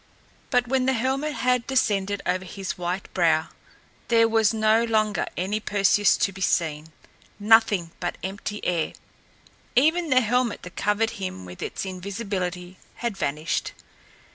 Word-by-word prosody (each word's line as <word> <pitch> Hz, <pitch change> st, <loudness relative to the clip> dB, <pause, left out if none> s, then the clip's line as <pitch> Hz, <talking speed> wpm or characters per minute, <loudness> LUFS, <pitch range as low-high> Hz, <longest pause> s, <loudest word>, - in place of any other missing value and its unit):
But 245 Hz, -2 st, +2 dB
when 260 Hz, 0 st, +1 dB
the 265 Hz, -, +3 dB
helmet 265 Hz, +5 st, -1 dB
had 250 Hz, -2 st, +1 dB
descended 205 Hz, -6 st, 0 dB
over 185 Hz, +1 st, 0 dB
his 190 Hz, +1 st, -5 dB
white 180 Hz, +2 st, -4 dB
brow, 165 Hz, -3 st, +2 dB, 0.6 s
there 230 Hz, -1 st, +4 dB
was 225 Hz, -2 st, +3 dB
no 220 Hz, 0 st, +3 dB
longer 215 Hz, -2 st, +1 dB
any 195 Hz, +4 st, -1 dB
Perseus 205 Hz, -1 st, +3 dB
to 200 Hz, -, +1 dB
be 190 Hz, 0 st, -11 dB
seen! 160 Hz, -3 st, 0 dB, 0.5 s
Nothing 205 Hz, -5 st, +4 dB
but 175 Hz, -, -3 dB
empty 200 Hz, +2 st, -5 dB
air! 170 Hz, -3 st, 0 dB, 0.8 s
Even 320 Hz, +5 st, +3 dB
the 255 Hz, -1 st, +5 dB
helmet 245 Hz, 0 st, 0 dB
that 180 Hz, -, -10 dB
covered 210 Hz, +2 st, +1 dB
him 95 Hz, -, -5 dB
with 90 Hz, 0 st, -11 dB
its -, -, -4 dB
invisibility 185 Hz, -2 st, -4 dB, 0.2 s
had 235 Hz, -3 st, -3 dB
vanished! 155 Hz, -2 st, -2 dB
205 Hz, 140 wpm, -25 LUFS, 180-230 Hz, 0.8 s, the